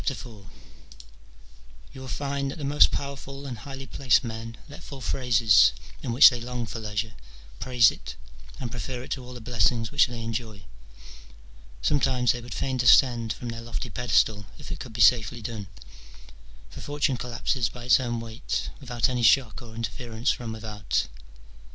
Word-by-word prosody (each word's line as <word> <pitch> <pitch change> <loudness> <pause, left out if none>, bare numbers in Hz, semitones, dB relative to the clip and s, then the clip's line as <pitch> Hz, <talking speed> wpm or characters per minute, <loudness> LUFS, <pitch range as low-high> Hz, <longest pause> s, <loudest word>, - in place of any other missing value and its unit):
You 130 - -10
will 130 - -8
find 140 +3 -2
that 135 - -6
the 150 - -7
most 145 +1 +5
powerful 140 0 -6
and 130 -3 -5
highly 135 +4 -8
placed 130 -1 +2
men 115 0 -6
let 145 0 -11
fall 140 - -9
phrases 110 - +4 0.3
in 125 - -3
which 125 +4 +9
they 120 -1 -5
long 120 0 -4
for 115 - -6
leisure, 110 0 -3 0.5
praise 125 -4 +4
it, - - -9 0.4
and 120 -3 -5
prefer 125 +1 -5
it - - -12
to 130 - -3
all 125 0 -10
the 120 - -9
blessings 115 0 +1
which 145 - +4
they 120 -2 -6
enjoy. 110 -4 -5 1.2
Sometimes 125 - +2
they 120 - -4
would 120 0 -8
fain 130 -1 -2
descend 120 -1 +5
from 120 - -7
their 115 0 -6
lofty 115 0 -5
pedestal, 110 -4 +1
if - - -10
it - - -5
could - - -8
be 115 - -2
safely 115 +3 +4
done: 105 -3 -6 1.0
for - - -9
Fortune 145 -1 0
collapses 120 0 -1
by 120 +3 -10
its 125 +1 +5
own 120 -2 -2
weight, 115 0 -4
without 120 -4 0
any 125 -1 -1
shock 115 -2 +3
or 115 -2 -11
interference 115 +1 -2
from 120 -2 -5
without. 110 -1 -2
120 Hz, 170 wpm, -26 LUFS, 115-130 Hz, 1.2 s, which